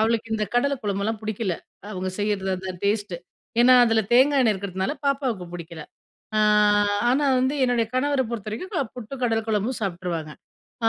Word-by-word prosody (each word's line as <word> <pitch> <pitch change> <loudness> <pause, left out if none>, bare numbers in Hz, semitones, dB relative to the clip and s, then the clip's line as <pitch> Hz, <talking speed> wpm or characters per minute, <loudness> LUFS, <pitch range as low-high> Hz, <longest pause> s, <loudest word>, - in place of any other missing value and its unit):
அவளுக்கு 225 0 +1
இந்த 215 -1 0
கடல 280 +4 +2
குழம்புலாம் 205 +2 -1
புடிக்கல. 215 -3 -2 0.4
அவங்க 185 -2 -3
செய்றது, 205 -2 -1
அந்த 190 +1 -6
டேஸ்ட்டு. 205 -3 0 0.4
ஏன்னா, 255 +1 +7
அதில 225 -1 +2
தேங்காய் 270 +3 +5
எண்ணெய் 220 -3 +3
இருக்கிறதுனால 190 +5 -3
பாப்பாவுக்கு 260 -9 -1
புடிக்கல. 170 -2 -8 0.5
ஆ - - +3 0.7
ஆனா 270 +4 +2
வந்து 260 +3 +1
என்னுடைய 245 -2 +1
கணவர 280 +1 +1
பொறுத்தவரைக்கும், 230 - -5
அ - - -4
புட்டு 245 +2 -7
கடல 225 -2 +2
குழம்பும் 220 +4 0
சாப்பிட்டுருவாங்க. 175 -5 -3 0.5
ஆ 225 - +5
220 Hz, 155 wpm, -24 LUFS, 195-245 Hz, 0.7 s, ஏன்னா